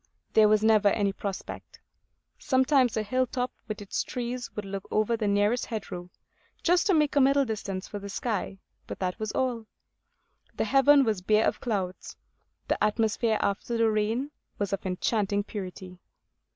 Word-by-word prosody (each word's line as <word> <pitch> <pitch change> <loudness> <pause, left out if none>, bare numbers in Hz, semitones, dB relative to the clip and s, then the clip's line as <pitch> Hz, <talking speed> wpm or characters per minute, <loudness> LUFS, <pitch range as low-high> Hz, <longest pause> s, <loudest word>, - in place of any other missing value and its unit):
There 215 -1 +6
was 215 0 +3
never 215 -2 +5
any 200 -1 +2
prospect; 200 -1 -7 0.6
sometimes 260 -2 +3
a 215 - +1
hill 255 +4 0
top 250 0 -2 0.2
with 215 -2 -5
its 200 - -2
trees 245 0 -4
would 210 - -4
look 195 0 -6
over 215 +2 +1
the 220 -2 -2
nearest 205 +4 +2
hedgerow, 180 -5 -6 0.5
just 355 +2 +3
to 385 - +4
make 300 -2 +2
a 285 - +5
middle 275 +1 +4
distance 200 -4 -4
for 205 - -6
the 200 0 -8
sky; 200 -2 -3 0.3
but - - -6
that 185 +2 -3
was 215 -1 -3
all. 240 -4 -1 0.9
The - - 0
heaven 280 +1 +5
was 215 -6 0
bare 215 +3 +3
of - - -1
clouds. 190 -6 -3 0.5
The - - 0
atmosphere, 220 +1 +1
after 200 +4 -1
the 225 -1 +3
rain, 225 +7 -1 0.3
was 200 -1 -2
of 195 -1 -3
enchanting 200 +2 0
purity. 185 -3 -8
215 Hz, 165 wpm, -27 LUFS, 200-245 Hz, 0.9 s, There